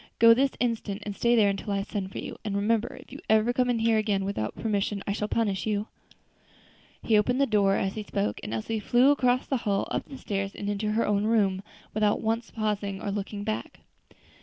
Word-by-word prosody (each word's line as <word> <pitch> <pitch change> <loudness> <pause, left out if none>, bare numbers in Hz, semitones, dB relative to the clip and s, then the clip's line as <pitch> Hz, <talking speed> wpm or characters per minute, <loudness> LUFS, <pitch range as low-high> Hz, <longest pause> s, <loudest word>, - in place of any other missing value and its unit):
go 230 0 +8
this 270 +4 +3
instant, 220 -4 -2
and 205 -1 -4
stay 235 +3 +3
there 215 -3 +5
until 200 +1 -4
I 195 0 0
send 195 -2 -4
for - - -8
you; - - -5
and 205 -2 -3
remember, 220 +3 0
if - - -16
you 275 - -8
ever 220 +2 +4
come 250 -1 +1
in 245 - +2
here 225 -1 +3
again 205 -3 0
without 150 - -3
permission 205 -2 -1
I - - -1
shall 210 0 -2
punish 210 -3 -1
you." 210 0 -1 1.1
He 215 -2 +4
opened 250 +5 +1
the 280 - +5
door 200 -5 +3
as 195 -1 -1
he 215 - -4
spoke, 105 - -2
and - - -6
Elsie 115 - -2
flew 245 +6 +4
across 255 -3 +2
the 270 - 0
hall, 205 -4 -1
up - - -1
the 275 - -9
stairs, 195 -5 -3
and 200 - -5
into 210 +1 -1
her 230 - +2
own 205 0 +1
room, 200 -4 +2 0.3
without 210 -1 +2
once 225 +1 -1
pausing 205 -3 -2
or 200 - -3
looking 205 0 -4
back. 215 +1 -4
210 Hz, 220 wpm, -27 LUFS, 200-230 Hz, 1.1 s, go